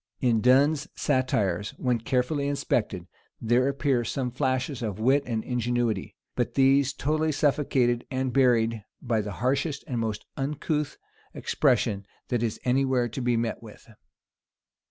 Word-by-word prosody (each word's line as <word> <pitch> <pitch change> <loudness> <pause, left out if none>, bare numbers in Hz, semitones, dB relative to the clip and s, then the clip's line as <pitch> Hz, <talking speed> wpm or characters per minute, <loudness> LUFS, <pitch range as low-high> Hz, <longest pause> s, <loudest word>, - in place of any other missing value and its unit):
In 115 -4 +2
Donne's 140 +5 +4
satires, 105 - 0
when 125 -2 0
carefully 130 +4 0
inspected, 105 -10 -1 0.3
there 120 +3 +2
appear 140 -3 +1
some 125 +1 -2
flashes 130 +1 -1
of 105 -4 -3
wit 135 +6 +3
and 115 -3 -2
ingenuity; 120 -4 -1 0.2
but - - -1
these 135 0 +4
totally 155 +3 0
suffocated 135 -5 +1
and 130 -1 -2
buried 115 -4 +3 0.2
by 115 -4 0
the 105 -1 -5
harshest 140 - -1
and 125 -4 -3
most 110 -2 -3
uncouth 150 +1 -2 0.4
expression 100 -1 +1 0.2
that 120 -3 0
is 115 -3 -2
any 130 +2 +2
where 130 -2 +1
to 125 +4 -5
be 120 -1 +1
met 115 -1 -2
with. 110 -2 -13
125 Hz, 140 wpm, -26 LUFS, 115-140 Hz, 0.4 s, Donne's